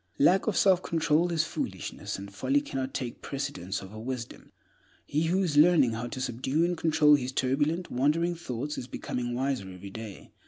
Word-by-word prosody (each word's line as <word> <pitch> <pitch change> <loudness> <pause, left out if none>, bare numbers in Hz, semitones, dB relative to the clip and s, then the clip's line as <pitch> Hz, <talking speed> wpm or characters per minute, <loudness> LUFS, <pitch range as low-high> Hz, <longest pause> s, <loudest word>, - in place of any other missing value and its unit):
Lack 190 +4 +4
of 215 - +1
self 190 -2 +5
control 165 +1 +1
is 160 -2 +2
foolishness, - - -4
and 100 0 -9
folly 275 - +2
cannot 135 - -4
take 125 -4 -5
precedence 135 -9 -4
over 105 +3 -9
wisdom. 125 0 -6 0.5
He 150 +3 0
who 185 +4 +2
is 155 -5 0
learning 155 -5 +6
how 115 +2 -3
to 130 - -6
subdue 130 +6 0
and 175 0 0
control 155 -2 +4
his 130 -3 +2
turbulent, 145 +7 0
wandering 155 +7 +2
thoughts 150 -3 -4
is 125 - -7
becoming 120 -1 -4
wiser 130 -6 -1
every 95 +1 -9
day. 110 -1 -9
140 Hz, 180 wpm, -28 LUFS, 120-165 Hz, 0.5 s, learning